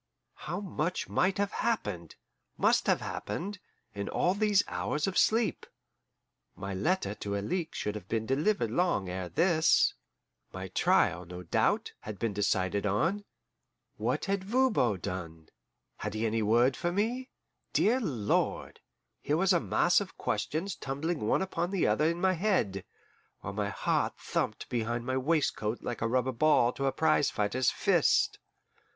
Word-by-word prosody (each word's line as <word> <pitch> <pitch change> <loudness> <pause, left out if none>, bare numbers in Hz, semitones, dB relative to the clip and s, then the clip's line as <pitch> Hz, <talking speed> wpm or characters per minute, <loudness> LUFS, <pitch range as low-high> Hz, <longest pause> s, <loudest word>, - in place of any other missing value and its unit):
How 175 - -2
much 180 -3 -2
might 185 +1 +1
have 200 0 0
happened, 105 - -2 0.4
must - - +3
have - - +3
happened, 195 +3 -4 0.3
in 100 0 -4
all 180 - +1
these 205 -1 +3
hours 150 0 -1
of 195 - -2
sleep! 225 0 +2 0.9
My 100 0 -5
letter 105 - 0
to 100 -1 -4
Alixe 165 - -3
should 105 - -2
have 105 -3 -8
been 110 -1 -1
delivered 135 - +1
long 145 - +1
ere 90 0 -4
this; 165 - +3 0.6
my 95 0 -6
trial, 90 0 +2
no 90 +1 -9
doubt, - - +1
had 105 -2 -7
been 115 -1 -1
decided 100 -1 0
on. 170 - 0 0.7
What - - -1
had 195 -2 -1
Voban 210 - +2
done? 80 -3 -6 0.5
Had - - -4
he 110 +1 -1
any 110 0 0
word 120 +5 +3
for 175 - -1
me? 235 +7 -1 0.4
Dear 240 +5 +3
Lord! 120 - -1 0.4
here 150 - 0
was 190 +2 +3
a 175 - +4
mass 105 - +3
of - - -8
questions 170 +5 -2
tumbling 145 +5 -3
one 190 - +2
upon 175 -2 -2
the 195 -2 0
other 110 +9 +2
in 170 +1 -2
my 190 +1 +3
head, 160 - 0 0.6
while - - -5
my - - -1
heart - - 0
thumped - - -3
behind 120 0 -2
my 130 0 0
waistcoat 130 -6 0
like 120 - -4
a 115 - +1
rubber 130 +2 +1
ball 125 -2 +3
to 135 - -2
a - - +2
prize 145 +1 +2
fighter's 115 +4 +1
fist. - - +2
135 Hz, 155 wpm, -30 LUFS, -, 0.9 s, a